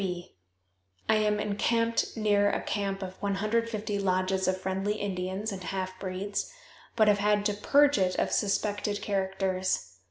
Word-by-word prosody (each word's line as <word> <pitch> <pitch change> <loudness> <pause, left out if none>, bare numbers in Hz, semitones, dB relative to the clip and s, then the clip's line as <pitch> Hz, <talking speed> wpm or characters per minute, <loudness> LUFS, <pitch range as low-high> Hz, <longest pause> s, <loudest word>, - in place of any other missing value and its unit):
B. 180 -2 -4 0.7
I 220 - +4
am 210 -1 +2
encamped 230 +3 0
near 205 -2 +3
a - - 0
camp 195 -1 -2
of 185 0 -8
150 210 +1 -1
lodges 190 0 +1
of 185 0 +1
friendly 190 +2 -1
Indians 195 +1 -3
and 190 -2 -6
half 185 +1 -4
breeds, 195 +2 -3 0.4
but 220 -2 +4
have 205 -1 +4
had 205 0 +2
to 205 - +2
purge 285 +5 +4
it 185 -1 +2
of - - 0
suspected 205 0 0
characters. 190 - -1
200 Hz, 150 wpm, -29 LUFS, 190-210 Hz, 0.7 s, I